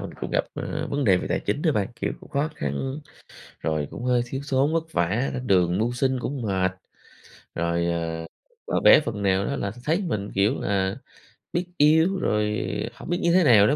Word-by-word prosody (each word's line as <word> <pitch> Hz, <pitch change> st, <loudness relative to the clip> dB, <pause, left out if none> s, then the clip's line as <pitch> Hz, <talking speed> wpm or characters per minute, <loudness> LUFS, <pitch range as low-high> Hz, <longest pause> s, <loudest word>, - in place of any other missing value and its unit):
mình -, -, -6 dB
cũng -, -, -4 dB
gặp, -, -, +1 dB
ờ, -, -, -3 dB
vấn 140 Hz, 0 st, 0 dB
đề 95 Hz, -4 st, +5 dB
về -, -, -3 dB
tài -, -, 0 dB
chính 145 Hz, -, -2 dB
đó 160 Hz, -, +3 dB
bạn. 100 Hz, -6 st, 0 dB
Kiểu -, -, -1 dB
cũng -, -, -15 dB
khó 145 Hz, +2 st, 0 dB
khăn, 70 Hz, -, -3 dB, 0.6 s
rồi 75 Hz, -2 st, -1 dB
cũng -, -, -7 dB
hơi 125 Hz, -1 st, +2 dB
thiếu 135 Hz, +3 st, -5 dB
thốn 135 Hz, +3 st, +2 dB
vất 165 Hz, 0 st, -1 dB
vả, 100 Hz, +10 st, +1 dB
lên 125 Hz, 0 st, -4 dB
đường 90 Hz, -3 st, +3 dB
mưu 115 Hz, +4 st, +1 dB
sinh 130 Hz, +1 st, 0 dB
cũng 135 Hz, +2 st, -4 dB
mệt. 95 Hz, -4 st, +1 dB, 0.8 s
Rồi, 85 Hz, 0 st, 0 dB
ờ, 85 Hz, -1 st, -2 dB, 0.4 s
và -, -, 0 dB
bé -, -, +8 dB
phần 110 Hz, -8 st, -4 dB
nào 95 Hz, 0 st, +2 dB
đó -, -, -2 dB
là 100 Hz, -, -2 dB
th 110 Hz, -, -12 dB
thấy 165 Hz, +7 st, +1 dB
mình, 100 Hz, -9 st, -2 dB
kiểu 100 Hz, +7 st, +2 dB
là, 95 Hz, -1 st, 0 dB, 0.6 s
biết 175 Hz, +1 st, 0 dB
yêu 160 Hz, +6 st, +4 dB
rồi 105 Hz, 0 st, 0 dB, 0.3 s
hổng 125 Hz, -, -11 dB
biết 175 Hz, -, 0 dB
như 170 Hz, -, +3 dB
thế 185 Hz, 0 st, +5 dB
nào 110 Hz, -8 st, +7 dB
nữa, 145 Hz, -, +3 dB
110 Hz, 220 wpm, -25 LUFS, 95-140 Hz, 0.8 s, bé